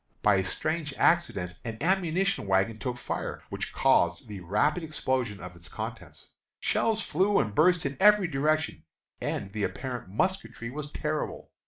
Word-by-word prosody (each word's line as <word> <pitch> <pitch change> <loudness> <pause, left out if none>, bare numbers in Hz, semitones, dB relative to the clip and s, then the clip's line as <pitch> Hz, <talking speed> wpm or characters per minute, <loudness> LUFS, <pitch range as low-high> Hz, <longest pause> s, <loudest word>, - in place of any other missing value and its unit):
By 105 -2 +5
a 95 - +2
strange 155 - -2
accident 100 - +2
an 115 -2 -5
ammunition 185 - +1
wagon 95 +4 +2
took 125 -1 -3
fire, - - -4
which - - -3
caused 85 +4 +2
the 105 -2 -7
rapid 105 - +1
explosion 130 -9 -1
of 90 0 -9
its 85 -2 -11
contents. - - -7 0.3
Shells 220 -1 +1
flew 195 +5 +2
and 110 -6 +1
burst 175 - +4
in 140 0 -2
every 210 -1 +6
direction, 155 - 0 0.4
and 95 -1 -3
the 105 - -3
apparent 125 -1 -3
musketry 120 - -2
was 145 +1 -6
terrible. 155 0 -3
135 Hz, 155 wpm, -28 LUFS, 105-170 Hz, 0.4 s, every